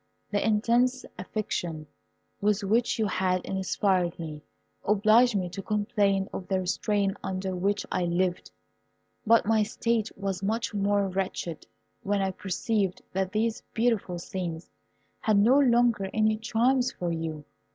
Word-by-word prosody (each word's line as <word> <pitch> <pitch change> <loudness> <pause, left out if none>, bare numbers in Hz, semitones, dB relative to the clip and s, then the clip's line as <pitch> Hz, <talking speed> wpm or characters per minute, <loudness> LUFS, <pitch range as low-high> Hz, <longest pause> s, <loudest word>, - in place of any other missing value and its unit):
The 205 - +1
intense 240 +4 +2
affection 175 -6 -3 0.6
with 205 0 +1
which 225 +6 +1
you 220 - +1
had 185 -2 0
inspired 190 -2 0
me 155 -3 -6 0.4
obliged 215 +3 +4
me 185 -3 0
to 190 +3 -6
complain 205 -2 +1
of 180 - -5
the 190 -1 +1
restraint 195 +2 0
under 190 0 -3
which 200 +3 0
I 180 -1 0
lived; 175 +1 -1 0.8
but 230 +1 +5
my 220 0 +3
state 225 +1 0
was 195 -1 -3
much 220 +3 -1
more 200 0 +1
wretched 185 -3 -4 0.3
when 200 0 0
I 195 -1 0
perceived 195 +1 -2
that 190 0 -1
these 220 +2 0
beautiful 225 -6 +1
scenes 170 -1 -5 0.5
had 215 -2 +2
no 240 +7 +5
longer 240 -6 +3
any 215 0 +3
charms 245 +3 +1
for 175 -1 -3
you. 160 -2 -4
200 Hz, 140 wpm, -27 LUFS, 185-220 Hz, 0.8 s, but